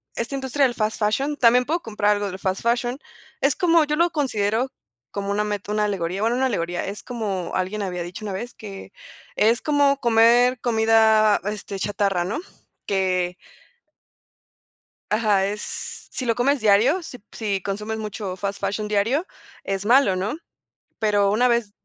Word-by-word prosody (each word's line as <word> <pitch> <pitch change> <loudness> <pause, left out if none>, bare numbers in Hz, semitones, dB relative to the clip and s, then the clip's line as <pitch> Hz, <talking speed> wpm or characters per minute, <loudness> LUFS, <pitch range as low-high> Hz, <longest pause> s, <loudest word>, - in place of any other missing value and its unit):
esta 235 +4 -3
industria 270 +1 +1
del 245 - 0
fast 215 0 -1
fashion 270 +8 0
también 250 0 +5
puedo 335 +3 -1
comprar 210 -1 0
algo 205 0 -2
del 190 0 -6
fast 190 0 -2
fashion 240 +3 0 0.4
es - - +3
como, 335 -4 +4
yo 300 +1 -1
lo 340 +2 +2
considero 245 -4 0 0.4
como 200 0 -3
una 210 +1 +1
meta, 205 0 -4
una 210 0 +1
alegoría, 190 -1 -2
bueno, 230 +2 +1
no 265 - +2
alegoría, 175 -7 -2
es 200 0 -6
como 205 -7 -4
alguien 190 +3 -2
había 180 -3 -3
dicho 180 +5 -8
una 200 - -4
vez 235 +6 -5
que 200 -3 -10 0.5
es 230 +3 +3
como 285 -2 +3
comer 240 +2 +4
comida, 220 -2 +4
este, 205 -2 -5
chatarra, 195 -3 0
¿no?, 205 +9 -3 0.5
que 185 -2 0 1.8
ajá, 210 -3 +2
es, 210 +1 -6
si 255 - -4
lo 230 -1 +1
comes 275 +3 +2
diario, 220 - +4
si 250 -6 -9
si 200 -4 -2
consumes 210 +3 -4
mucho 210 -3 -5
fast 200 +1 -4
fashion 200 +2 -2
diario, 225 - +1 0.4
es 195 0 -2
malo, 240 -3 +5
¿no?, 195 +9 -2 0.6
pero 205 -2 +2
una 245 +4 +3
vez, 235 -4 +1
215 Hz, 165 wpm, -23 LUFS, 200-245 Hz, 1.8 s, también